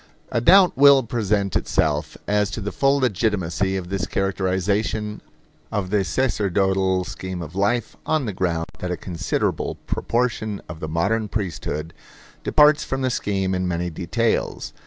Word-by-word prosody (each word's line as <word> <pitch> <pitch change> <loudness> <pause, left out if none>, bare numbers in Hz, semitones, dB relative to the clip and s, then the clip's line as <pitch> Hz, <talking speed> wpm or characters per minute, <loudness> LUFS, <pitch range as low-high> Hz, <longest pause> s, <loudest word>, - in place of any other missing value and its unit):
A 115 - +1
doubt 185 +6 +6
will 140 0 +7
present 105 -4 -1
itself - - 0
as 105 -1 +2
to 105 - -5
the 105 0 -4
full 135 0 +2
legitimacy 100 - 0
of 90 -2 -6
this 95 -2 -2
characterization 100 +3 -1 0.5
of 100 -4 -2
the 105 -2 +2
sacerdotal 95 -3 +1
scheme 95 0 -6
of 80 +1 -9
life, 100 +5 0
on 155 -4 0
the 105 - -3
ground 85 -3 -1
that 90 - -4
a 90 - -2
considerable 85 -3 -2
proportion 115 -4 -1
of 80 - -8
the 80 - -5
modern 100 +7 0
priesthood 85 -6 -4 0.5
departs 150 0 +5
from 135 -2 -3
the 130 - +1
scheme 95 -4 -1
in 90 0 -1
many 90 0 -2
details. 110 +8 -1
100 Hz, 150 wpm, -22 LUFS, 90-115 Hz, 0.5 s, will